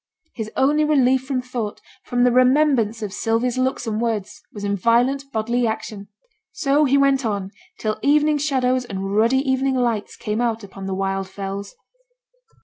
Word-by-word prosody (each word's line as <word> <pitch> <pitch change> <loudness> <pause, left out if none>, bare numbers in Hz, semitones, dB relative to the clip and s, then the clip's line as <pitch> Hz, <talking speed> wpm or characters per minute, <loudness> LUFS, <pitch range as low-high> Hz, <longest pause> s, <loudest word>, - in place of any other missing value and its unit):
His 220 -3 -5
only 295 +3 +3
relief 265 -3 +3
from 260 -2 -1
thought, 240 -4 -4 0.3
from 245 0 +1
the 250 - +4
remembrance 255 -3 +3
of 200 -2 -4
Sylvia's 230 +4 0
looks 260 -1 -1
and 220 -1 -2
words, 220 -4 -3
was 205 - -8
in 200 0 0
violent 250 +7 +1
bodily 235 +2 0
action. 215 -2 -5 0.5
So 290 +1 +2
he 275 0 +3
went 275 -1 +3
on 200 -4 -2 0.3
till 215 -1 -2
evening 300 +1 +3
shadows 255 -3 +1
and 195 -3 -4
ruddy 260 +6 +2
evening 265 0 +1
lights 235 -4 -1
came 210 +2 -3
out 230 -2 -1
upon 195 -1 -8
the 190 - -2
wild 195 0 -2
fells. 195 +1 -6
240 Hz, 165 wpm, -21 LUFS, 210-265 Hz, 0.5 s, the